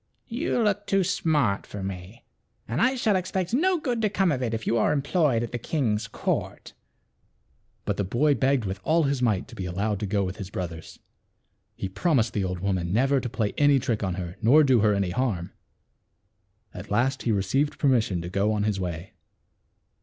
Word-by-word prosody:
You 245 +3 -1
look 205 -1 0
too 195 -1 +2
smart 150 - 0
for 100 -2 -7
me, 95 +2 -7 0.4
and 120 - -1
I 255 +4 +3
shall 220 -5 +1
expect 185 -1 -2 0.3
good 240 -3 -1
to 215 - +2
come 195 -3 +1
of 130 -3 -1
it 120 -3 -1
if 110 -1 -4
you - - +1
are - - +2
employed 145 -4 +1
at 120 - -5
the 120 - -3
king's 115 -6 -1
court." 105 - -3 1.1
But - - -1
the - - 0
boy 135 +10 +2
begged 135 -4 +1
with 95 0 -4
all 165 +1 +3
his 140 -2 0
might 110 -6 +1
to - - -12
be 95 - -4
allowed 100 +3 -1
to 105 - -3
go 100 0 0
with 95 0 -4
his 100 -3 -7
brothers. 85 -4 -6 0.8
He - - -4
promised 115 - +1
the 100 - 0
old 90 -1 -3
woman 95 -3 -1
never 135 +6 +3
to 125 - -4
play 110 -3 -2
any 145 -1 +5
trick 125 -4 -1
on 95 -3 -1
her 90 -1 -6
nor 135 +8 +6
do 130 -4 +4
her 105 -1 +3
any 100 -2 0
harm. 95 -6 -1 1.2
At 95 +3 -9
last 120 +6 +1
he 120 - 0
received 110 +9 0
per 145 - +1
mission 110 -9 +1
to 85 - -5
go 100 +3 +1
on 105 -1 0
his 105 -2 0
way. 90 -1 -5
115 Hz, 200 wpm, -26 LUFS, 95-145 Hz, 1.2 s, nor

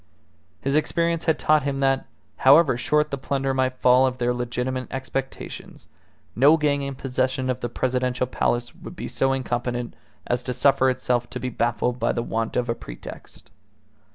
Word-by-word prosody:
His 140 +1 0
experience 170 +2 0
had 160 - +2
taught 155 0 +3
him 140 0 -2
that, 135 0 +1 0.3
however 140 0 +6
short 150 +5 +1
the 140 - -3
plunder 135 0 -1
might 130 -1 0
fall 125 +1 +5
of 130 -1 -3
their 125 0 +1
legitimate 125 +1 -3
expectations, 135 0 -6 0.5
no 140 +8 +6
gang 145 -2 +1
in 140 -1 -4
possession 130 0 -1
of 125 - -4
the 120 - -3
Presidential 125 +1 0
Palace 120 -1 -1
would - - -11
be - - -5
so 135 - +1
incompetent 120 -2 -2 0.3
as 120 0 0
to 125 +1 -3
suffer 130 +1 +3
itself 125 -1 -1
to - - -5
be 130 - -3
baffled 120 +1 -1
by 115 - +1
the 120 - -2
want 115 -1 -2
of 125 -1 0
a 115 - +1
pretext. - - -11
130 Hz, 175 wpm, -24 LUFS, 125-135 Hz, 0.5 s, however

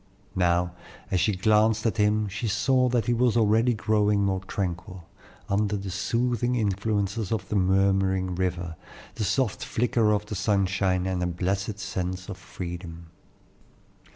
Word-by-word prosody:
Now, 90 -1 +2 0.4
as 95 - +2
she 95 +4 +2
glanced 110 +3 +3
at 115 0 0
him 105 0 +2
she 105 +4 -4
saw 125 +5 +2
that 120 -3 +1
he 120 - +2
was 120 0 +2
already 115 +2 +3
growing 105 -1 +2
more 95 -1 0
tranquil, 90 -2 -4 0.4
under 105 +1 0
the 95 -1 -5
soothing 120 +5 0
influences 100 -1 -1
of 100 -5 -2
the - - -1
murmuring 95 -1 +2
river, 90 -2 -2 0.4
the 110 - -3
soft 110 0 0
flicker 120 -4 +1
of 105 0 0
the 105 - -6
sunshine, 95 -2 +1
and 95 -1 -1
a 90 - 0
blessed 95 +4 -2
sense 90 0 -4
of 95 - -6
freedom. 85 -2 -8
100 Hz, 150 wpm, -26 LUFS, 95-110 Hz, 0.4 s, glanced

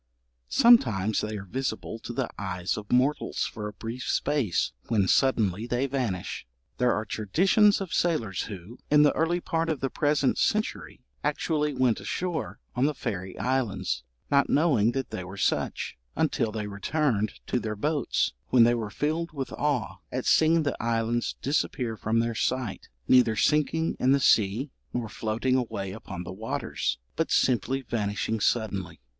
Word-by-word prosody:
Sometimes 110 - +4
they 105 0 -3
are 100 - -7
visible 115 0 -4
to 120 - -7
the 125 0 -1
eyes 90 -2 -2
of 105 -1 -8
mortals 130 +4 +1
for 105 -2 -5
a 105 - -7
brief 115 +4 -6
space, 140 - +1 0.2
when 105 -5 +2
suddenly 110 -4 +2
they 125 +2 0
vanish. 125 - -3 0.3
There 125 -1 +4
are 110 -1 -1
traditions 190 - +3
of 195 -3 -5
sailors 115 - 0
who, 100 +4 -9
in 150 0 +6
the 145 - +4
early 165 +2 +1
part 165 -1 -1
of 155 -4 -1
the 135 - -2
present 145 -3 +1
century, 215 +2 -1 0.2
actually 150 -3 0
went 125 -3 +2
ashore 170 - -3 0.2
on 125 - +2
the 150 - -1
fairy 95 -7 -4
islands 115 - -1 0.3
not 140 -1 +4
knowing 135 -8 +3
that 135 -1 -3
they 95 - -4
were 95 +2 -9
such, 100 - -1 0.2
until 110 - +1
they 105 -1 -3
returned 110 +2 0
to 125 - 0
their 110 -2 -3
boats, 145 - 0
when 125 -2 +6
they 120 +1 +5
were 115 -3 -2
filled 160 +9 -2
with 135 -3 -4
awe 145 -7 -1
at 130 0 -3
seeing 160 0 +4
the 145 - -1
islands 115 0 0
disappear 130 -4 0
from 110 +2 +1
their 115 0 -1
sight, 125 -1 -2 0.2
neither 125 -3 +5
sinking 155 +6 +2
in 130 +2 +4
the 140 - +3
sea, 115 +3 +3 0.2
nor 120 -2 -1
floating 115 +4 -1
away 100 -6 -2
upon 95 -3 -7
the 90 - -7
waters, 105 -8 -2 0.2
but 165 - 0
simply 130 +2 +1
vanishing 110 -1 -2
suddenly. 100 -4 -1
120 Hz, 160 wpm, -27 LUFS, 105-145 Hz, 0.3 s, in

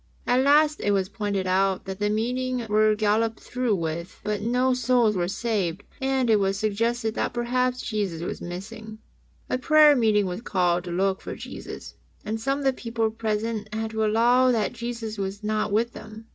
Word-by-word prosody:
At 250 +1 +3
last 300 +2 +4
it 205 - +1
was 190 -1 0
pointed 200 -2 -2
out 190 +1 +1
that 190 0 -6
the 205 0 +1
meetings 245 +2 -1
were 215 0 +3
galloped 220 +1 +1
through 250 -4 -1
with, 170 0 -4
but 210 -1 -2
no 250 +3 +2
souls 245 -3 +2
were 175 -1 0
saved, 200 -3 -2 0.2
and 265 -1 +1
it 220 -2 +4
was 195 0 0
suggested 220 +2 0
that - - -2
perhaps 250 +1 0
Jesus 195 -7 -2
was - - -5
missing. 215 +5 -7 0.5
A 255 - -1
prayer 305 +1 +6
meeting 215 -5 +3
was 180 +3 -4
called 180 -5 0
to 175 - -5
look 190 +2 0
for - - -6
Jesus, - - -9 0.3
and 220 +1 -3
some 275 +4 0
of 285 - -5
the 270 - +3
people 230 -3 -2
present 220 -1 -3
had 220 0 -3
to 220 0 -1
allow 240 +4 +4
that 225 -2 0
Jesus 230 -2 -5
was 195 +2 -4
not 215 0 -1
with 230 +3 +1
them. 220 +1 -11
220 Hz, 185 wpm, -25 LUFS, 200-240 Hz, 0.5 s, prayer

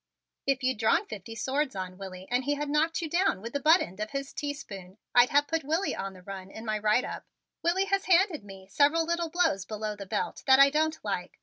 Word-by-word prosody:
"If 275 -1 +1
you'd 255 -4 0
drawn 285 - +3
fifty 215 - -8
swords 265 +3 -1
on 185 -1 -5
Willie 190 -1 -9
and 250 +1 +1
he 290 +1 +1
had 295 0 -3
knocked 320 +3 +1
you - - -2
down 345 - +1
with 230 +4 -8
the 285 - 0
butt 315 +5 +5
end 185 +3 -6
of 215 0 -3
his 275 +3 -5
teaspoon 195 -10 -6 0.2
I'd 245 0 +6
have 290 +1 +4
put 325 -1 -1
Willie 320 +7 0
on 195 0 -5
the 185 -1 -15
run 195 0 -8
in 220 +3 -9
my 215 -1 -1
write 215 +4 +2
up. - - -7 0.3
Willie 360 +3 +2
has 395 0 0
handed 370 - +3
me 195 -1 -12
several 295 +10 +3
little 340 0 -1
blows 315 - +1
below 215 0 -4
the 200 -1 -9
belt - - -3
that 265 0 +7
I 275 0 +7
don't 315 +1 +1
like. - - -4
270 Hz, 235 wpm, -28 LUFS, 205-315 Hz, 0.3 s, that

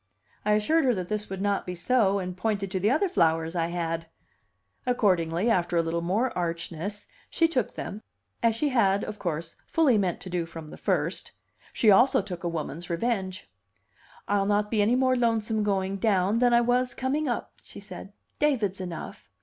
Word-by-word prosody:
I 210 - +2
assured 275 +10 +2
her 250 -3 +3
that 180 -2 -4
this 210 -1 -3
would 195 0 -4
not 200 -1 +1
be 180 - -5
so, 200 +1 +2
and 180 -2 -4
pointed 200 0 -2
to 190 - -1
the 200 +4 +2
other 310 - +2
flowers 165 - +1
I 165 -1 +1
had. 165 -1 -3 0.8
Accordingly, 185 -6 +1
after 175 -6 +2
a 165 - +3
little 165 +1 -1
more 205 +9 0
archness, 170 +3 -4 0.2
she 330 - +3
took 255 -9 -1
them, 210 - -6 0.4
as 230 -1 +3
she 290 +6 0
had, 200 -6 +2
of 210 - -6
course, 165 -1 -4
fully 285 -10 +3
meant 185 -4 -1
to 185 - -8
do 175 -2 -1
from 165 -2 -9
the - - -9
first; - - -1 0.4
she 220 - +4
also 260 +7 +5
took 185 -3 -6
a 175 - 0
woman's 165 +1 -5
revenge. 190 0 -2 0.8
"I'll 200 -1 +1
not 210 0 +1
be 215 -2 +2
any 220 +4 +3
more 255 0 +3
lonesome 225 -2 +1
going 195 -1 0
down 195 0 +2
than 245 0 +4
I 235 0 +5
was 250 +1 +1
coming 285 +4 -1
up," 240 - -3
she - - -11
said. - - -10 0.3
"David's 225 -11 +1
enough." 175 - -7
200 Hz, 190 wpm, -27 LUFS, 175-235 Hz, 0.8 s, also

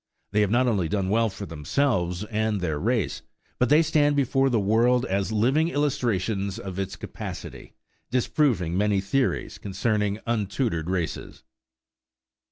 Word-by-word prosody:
They 105 +1 +2
have 105 - +2
not 120 +4 +3
only 95 -8 +1
done 95 -2 -1
well 115 +2 +2
for 100 +1 -7
themselves 90 - -1
and 110 -1 -1
their 80 -5 -2
race, 115 +2 0 0.4
but 125 - +2
they 150 +3 +6
stand 150 -2 +2
before 135 0 +2
the 120 -3 +2
world 120 +5 +3
as 100 -2 -1
living 130 +9 +2
illustrations 115 - -1
of 95 -1 -6
its 95 - -3
capacity, - - -8 0.3
disproving 120 - +1
many 105 0 +2
theories 120 +7 -1
concerning 105 +1 -1
untutored 105 - -1
races. 90 -3 -3
105 Hz, 140 wpm, -25 LUFS, 95-125 Hz, 0.4 s, they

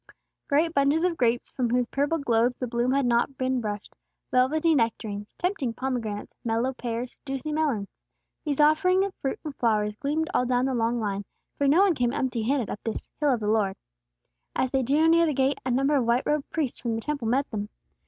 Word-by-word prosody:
Great 315 +4 +2
bunches 285 +3 +3
of 360 -2 +1
grapes 240 -4 0
from 250 -3 -1
whose 245 +1 +2
purple 285 +6 0
globes 245 -3 +1
the 255 - -2
bloom 240 +1 0
had 275 0 +2
not 240 +3 +1
been 260 -1 0
brushed, 210 -2 -5 0.4
velvety 305 +6 +3
nectarines, 220 -5 -1
tempting 350 - -1
pomegranates, 240 -4 -3
mellow 235 +2 0
pears, 240 -1 -4
juicy 270 +2 -4
melons, 285 -10 0 0.6
these 295 -2 -2
offerings 315 +6 +4
of 395 - -5
fruit 270 - -2
and 295 -2 -5
flowers 210 -3 +1
gleamed 305 +5 -1
all - - +3
down 250 0 +2
the 265 - 0
long 235 0 0
line, 205 -2 -2 0.3
for 285 - +1
no 310 +7 +5
one 390 -3 +4
came 245 -4 0
empty 255 -3 -1
handed 245 0 0
up - - -5
this 225 - -5
"Hill 295 -2 +3
of 240 -3 0
the 210 - -2
Lord." 210 -3 +1 0.8
As 260 - 0
they 270 - +2
drew 290 +6 +3
near 335 0 +5
the 300 - 0
gates, 270 +1 +1
a - - 0
number 275 +4 +2
of 260 -4 +2
white 240 +2 +3
robed 295 -1 0
priests 300 -6 -2
from 235 -3 -2
the 225 - -3
Temple 285 -3 -3
met 270 +5 +1
them. 210 -2 -4
255 Hz, 210 wpm, -26 LUFS, 230-290 Hz, 0.8 s, no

